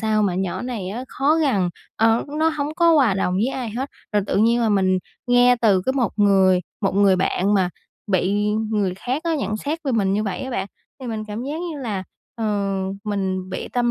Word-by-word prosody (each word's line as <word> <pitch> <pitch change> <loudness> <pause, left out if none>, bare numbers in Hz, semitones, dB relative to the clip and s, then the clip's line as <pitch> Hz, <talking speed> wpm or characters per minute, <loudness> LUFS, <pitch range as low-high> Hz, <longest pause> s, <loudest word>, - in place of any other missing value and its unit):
sao 215 -1 +1
mà 190 -3 +1
nhỏ 185 +3 -2
này 235 -7 -4
á 235 +6 -5
khó 280 +3 +2
gần, 245 - +2 0.3
ờ, 225 +1 +3
nó 320 +1 +4
hổng 300 -1 -3
có 335 -1 +5
hòa 260 -10 +4
đồng 185 -1 0
với 200 +5 +1
ai 255 -3 -3
hết." 255 +6 -4 0.2
Rồi 205 -1 +2
tự - - -1
nhiên 230 +3 +3
là 225 - +2
mình 190 -2 +2 0.3
nghe 245 0 +5
từ 200 -5 +4
cái 260 - +2
một 255 -4 0
người 190 -3 +4 0.2
một 195 -2 0
người 195 -1 +4
bạn 190 +2 +1
mà 185 -2 +2 0.4
bị 200 +1 +1 0.3
người 200 -4 0
khác 255 - -3
á, 330 - +1
nhận 215 -8 -2
xét 295 +8 -3
về 270 - 0
mình 195 -4 +1
như 210 +2 +1
vậy 200 -3 -3
á 265 - -5
bạn. 195 -6 -2 0.3
Thì 255 - -7
mình 220 -2 -4
cảm 215 +3 -4
giác 295 +4 -4
như 295 - -7
là, 205 -6 -3 0.3
ờ, 230 -3 -4 0.6
mình 190 -2 -2
bị - - -5
tâm 240 -1 +1
215 Hz, 225 wpm, -22 LUFS, 195-255 Hz, 0.6 s, có